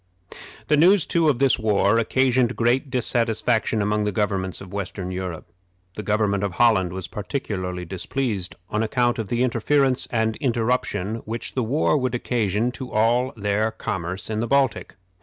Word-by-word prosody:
The 150 Hz, -, +3 dB
news, 180 Hz, +3 st, +5 dB
too, 165 Hz, -2 st, +2 dB
of 140 Hz, -, +1 dB
this 135 Hz, -1 st, +3 dB
war 105 Hz, 0 st, +2 dB
occasioned 125 Hz, +1 st, +2 dB
great 120 Hz, +4 st, +1 dB
dissatisfaction 115 Hz, -3 st, +1 dB
among 105 Hz, +1 st, 0 dB
the 105 Hz, -, 0 dB
governments 95 Hz, -2 st, -1 dB
of 95 Hz, -1 st, -11 dB
western 95 Hz, -2 st, -4 dB
Europe. 90 Hz, -3 st, -5 dB, 0.5 s
The -, -, -4 dB
government 105 Hz, -1 st, 0 dB
of 100 Hz, -3 st, -2 dB
Holland 95 Hz, -4 st, +3 dB
was 95 Hz, -1 st, -6 dB
particularly 95 Hz, -6 st, -4 dB
displeased, 95 Hz, +1 st, -3 dB, 0.2 s
on 105 Hz, -, 0 dB
account 120 Hz, +1 st, +1 dB
of 110 Hz, -, -3 dB
the 120 Hz, +4 st, 0 dB
interference 130 Hz, +2 st, +1 dB
and 110 Hz, -1 st, 0 dB
interruption 115 Hz, -5 st, -1 dB
which 115 Hz, +2 st, -5 dB
the 130 Hz, -, 0 dB
war 140 Hz, +6 st, +1 dB
would 130 Hz, -3 st, -1 dB
occasion 115 Hz, -1 st, 0 dB
to 130 Hz, 0 st, -8 dB
all 120 Hz, +4 st, +2 dB
their 105 Hz, +1 st, 0 dB
commerce 95 Hz, -4 st, -4 dB
in 110 Hz, -1 st, -2 dB
the 115 Hz, -, -1 dB
Baltic. 135 Hz, -5 st, +1 dB
110 Hz, 160 wpm, -23 LUFS, 100-125 Hz, 0.5 s, news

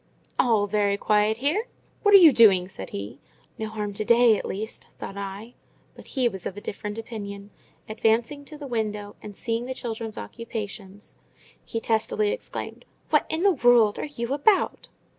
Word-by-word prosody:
"All 220 Hz, -4 st, +3 dB
very 205 Hz, -1 st, +1 dB
quiet 210 Hz, +1 st, +2 dB
here! 310 Hz, -, 0 dB, 0.3 s
What 410 Hz, -1 st, +6 dB
are -, -, +13 dB
you 330 Hz, -6 st, +8 dB
doing?" 195 Hz, -7 st, +6 dB
said 95 Hz, -, -8 dB
he. 100 Hz, +6 st, -7 dB, 0.4 s
"No 220 Hz, -, -2 dB
harm 210 Hz, -2 st, -4 dB
to 215 Hz, -, -2 dB
day, 235 Hz, +1 st, +5 dB
at -, -, -4 dB
least," 215 Hz, +3 st, -5 dB
thought 195 Hz, -, -7 dB
I. 200 Hz, +4 st, -7 dB, 0.4 s
But -, -, -14 dB
he 255 Hz, -3 st, +1 dB
was 190 Hz, -5 st, -4 dB
of 195 Hz, -, -7 dB
a -, -, -4 dB
different 205 Hz, +1 st, -6 dB
opinion. 205 Hz, -3 st, -7 dB, 0.4 s
Advancing 230 Hz, +5 st, 0 dB
to 305 Hz, +1 st, -9 dB
the 290 Hz, -, -8 dB
window, 210 Hz, -4 st, -3 dB
and 205 Hz, -2 st, -10 dB
seeing 230 Hz, 0 st, -2 dB
the 260 Hz, -, -4 dB
children's 225 Hz, -3 st, -5 dB
occupations, 205 Hz, -, -7 dB, 0.5 s
he 225 Hz, -, -4 dB
testily 225 Hz, -, +1 dB
exclaimed—"What 380 Hz, -9 st, -3 dB
in 320 Hz, +3 st, -1 dB
the 400 Hz, -, +6 dB
world 245 Hz, -, +4 dB
are -, -, -2 dB
you 260 Hz, -4 st, -4 dB
about?" 375 Hz, +8 st, +2 dB
220 Hz, 170 wpm, -25 LUFS, 205-245 Hz, 0.5 s, are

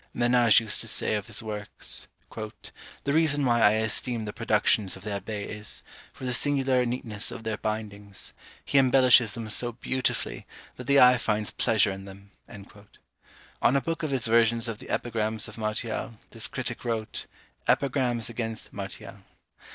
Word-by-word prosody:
Menage 120 Hz, -2 st, +5 dB
used 110 Hz, -2 st, 0 dB
to 115 Hz, -, -4 dB
say 110 Hz, -, -1 dB
of 105 Hz, -2 st, -2 dB
his 110 Hz, -1 st, -2 dB
works, 105 Hz, -1 st, -4 dB, 1.0 s
"The 140 Hz, -, 0 dB
reason 150 Hz, -3 st, +3 dB
why 120 Hz, -2 st, +3 dB
I 105 Hz, -1 st, +6 dB
esteem 110 Hz, +1 st, 0 dB
the 105 Hz, -, -5 dB
productions 105 Hz, -3 st, +2 dB
of 95 Hz, -, -14 dB
the 105 Hz, -, -4 dB
Abbé 100 Hz, +1 st, -4 dB
is, 105 Hz, 0 st, -6 dB, 0.3 s
for 130 Hz, -, -9 dB
the 125 Hz, -, -1 dB
singular 130 Hz, -2 st, +1 dB
neatness 115 Hz, -4 st, -3 dB
of 115 Hz, -, -7 dB
their 110 Hz, -1 st, -2 dB
bindings; 105 Hz, -2 st, -4 dB, 0.3 s
he 140 Hz, -, +4 dB
embellishes 125 Hz, -4 st, +5 dB
them 115 Hz, -2 st, -5 dB
so 120 Hz, +2 st, +2 dB
beautifully, 125 Hz, -, -2 dB, 0.3 s
that 125 Hz, -, -9 dB
the 140 Hz, 0 st, +5 dB
eye 125 Hz, -1 st, +7 dB
finds 105 Hz, -1 st, 0 dB
pleasure 110 Hz, -3 st, +2 dB
in 95 Hz, 0 st, -7 dB
them." 100 Hz, +1 st, -13 dB, 1.3 s
On 130 Hz, -, +4 dB
a -, -, +5 dB
book 165 Hz, +5 st, -3 dB
of 155 Hz, -, -1 dB
his 135 Hz, -4 st, 0 dB
versions 115 Hz, 0 st, +3 dB
of 110 Hz, -2 st, -4 dB
the -, -, -11 dB
Epigrams 110 Hz, -2 st, -1 dB
of -, -, -11 dB
Martial, 110 Hz, +1 st, -2 dB, 0.2 s
this 115 Hz, -1 st, -3 dB
critic 125 Hz, -2 st, -2 dB
wrote, 115 Hz, -3 st, -3 dB, 0.4 s
_Epigrams 125 Hz, -4 st, +2 dB
against 115 Hz, -1 st, -4 dB
Martial. 100 Hz, -2 st, -7 dB
115 Hz, 165 wpm, -27 LUFS, 105-125 Hz, 1.3 s, eye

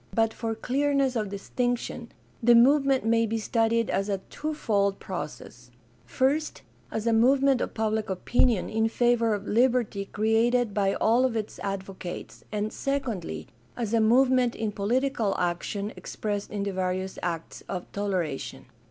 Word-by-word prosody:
But 225 Hz, -1 st, +2 dB
for 225 Hz, 0 st, -3 dB
clearness 275 Hz, +2 st, +1 dB
of 215 Hz, -3 st, -1 dB
distinction 240 Hz, +3 st, -3 dB, 0.3 s
the 240 Hz, 0 st, +6 dB
movement 270 Hz, +1 st, +4 dB
may 230 Hz, 0 st, +3 dB
be 225 Hz, +1 st, -1 dB
studied 225 Hz, +1 st, +1 dB
as 195 Hz, +1 st, 0 dB
a 200 Hz, -, +1 dB
twofold 205 Hz, -10 st, 0 dB
process: 150 Hz, -8 st, -7 dB, 0.4 s
first, 285 Hz, +4 st, 0 dB, 0.3 s
as 220 Hz, -, -3 dB
a 230 Hz, -, +3 dB
movement 265 Hz, +3 st, +4 dB
of -, -, -3 dB
public 220 Hz, -1 st, -1 dB
opinion 220 Hz, +3 st, +1 dB
in 220 Hz, 0 st, +1 dB
favor 235 Hz, -2 st, +2 dB
of 205 Hz, 0 st, -7 dB
liberty 235 Hz, -4 st, +2 dB
created 225 Hz, +2 st, +1 dB
by 195 Hz, -1 st, +1 dB
all 235 Hz, +3 st, +3 dB
of 255 Hz, -3 st, +1 dB
its 215 Hz, -2 st, -4 dB
advocates, 190 Hz, -2 st, -6 dB
and, 210 Hz, 0 st, -2 dB
secondly, 225 Hz, -, -3 dB, 0.3 s
as 230 Hz, -3 st, -2 dB
a 230 Hz, -, +4 dB
movement 250 Hz, +2 st, +4 dB
in 220 Hz, -2 st, -2 dB
political 225 Hz, +1 st, 0 dB
action 180 Hz, +4 st, -2 dB
expressed 205 Hz, -1 st, -4 dB
in 205 Hz, -1 st, -3 dB
the 200 Hz, -, -2 dB
various 185 Hz, 0 st, -2 dB
acts 170 Hz, -2 st, -4 dB
of 180 Hz, -2 st, -4 dB
toleration. 155 Hz, -10 st, -3 dB
220 Hz, 145 wpm, -27 LUFS, 200-245 Hz, 0.4 s, the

